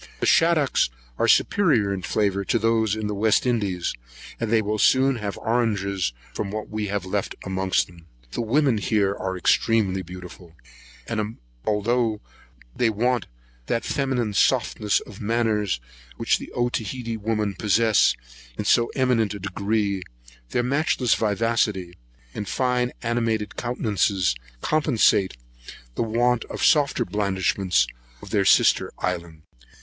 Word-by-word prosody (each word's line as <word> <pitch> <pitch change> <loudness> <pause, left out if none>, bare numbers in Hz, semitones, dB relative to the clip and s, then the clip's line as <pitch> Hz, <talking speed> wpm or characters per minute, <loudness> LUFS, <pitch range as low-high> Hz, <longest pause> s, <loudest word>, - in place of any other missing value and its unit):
The - - -1
shaddocks 165 - +3 0.3
are - - +2
superior 125 - +3
in 95 - -4
flavour 100 +1 0
to 115 - +1
those 110 -1 +1
of 110 -1 -3
the 105 - -2
West 110 +3 +2
Indies; 100 -8 0 0.5
and 115 - -2
they 115 - +4
will 105 +1 -2
soon 130 +2 +4
have 105 -3 -4
oranges 100 - 0 0.2
from 100 - -3
what 105 +1 -5
we 105 -1 -2
have 100 -1 -2
left 100 +1 -2
amongst 95 -1 +1
them. 85 -2 -18 0.2
The - - -2
women 125 0 +2
here 100 -1 +1
are 95 -1 -3
extremely 95 0 +2
beautiful; 90 -1 -11 0.5
and 110 0 -3 0.3
although 110 +1 +1 0.6
they 120 - +2
want 120 +3 0 0.4
that 115 - -1
feminine 130 -6 -1
softness 105 0 +2
of 105 - -12
manners 105 - 0 0.4
which - - +1
the - - -9
Otaheite 120 -1 -2
women 105 -1 -1
possess 110 - +3 0.4
in - - -3
so 115 - +4
eminent 120 -6 +1
a - - -7
degree, 100 +1 -1 0.5
their 120 - 0
matchless 130 -2 +1
vivacity, 105 -4 0 0.4
and 105 - -5
fine 125 -1 0
animated 115 -3 -1
countenances, 105 - 0 0.3
compensate 115 - +2 0.6
the - - -3
want 120 +1 +1
of - - -7
the - - +1
softer 145 -4 +3
blandishments 95 -6 +1 0.4
of - - -10
their - - +2
sister - - +4
island. 85 -3 -4
110 Hz, 135 wpm, -24 LUFS, 100-120 Hz, 0.6 s, they